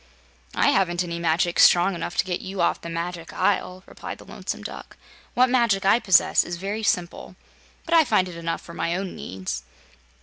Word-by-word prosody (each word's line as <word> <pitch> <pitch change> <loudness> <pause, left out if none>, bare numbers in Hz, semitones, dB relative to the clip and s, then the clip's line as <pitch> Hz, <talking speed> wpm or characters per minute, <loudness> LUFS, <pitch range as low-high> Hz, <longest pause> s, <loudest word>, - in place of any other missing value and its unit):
"I - - +3
haven't 180 -2 +1
any 170 -1 -5
magic 170 +1 +1
strong 180 +3 +6
enough 170 0 -5
to - - +2
get 180 -2 -3
you 190 0 -7
off 170 - +1
the 170 - -7
Magic 170 0 -5
Isle," 185 -2 -1
replied - - -8
the - - -15
Lonesome - - -6
Duck. - - -9 0.4
"What 255 +1 +5
magic 235 -6 +2
I 200 +4 +5
possess 190 -7 +4
is 175 - -5
very 200 +4 -4
simple, 180 -3 -2 0.5
but 335 - -2
I 330 -1 +7
find 210 -9 +2
it 180 - -9
enough 165 0 -4
for 170 - -12
my 170 0 -2
own 190 0 -4
needs." 95 -10 -5
180 Hz, 195 wpm, -24 LUFS, 170-195 Hz, 0.5 s, I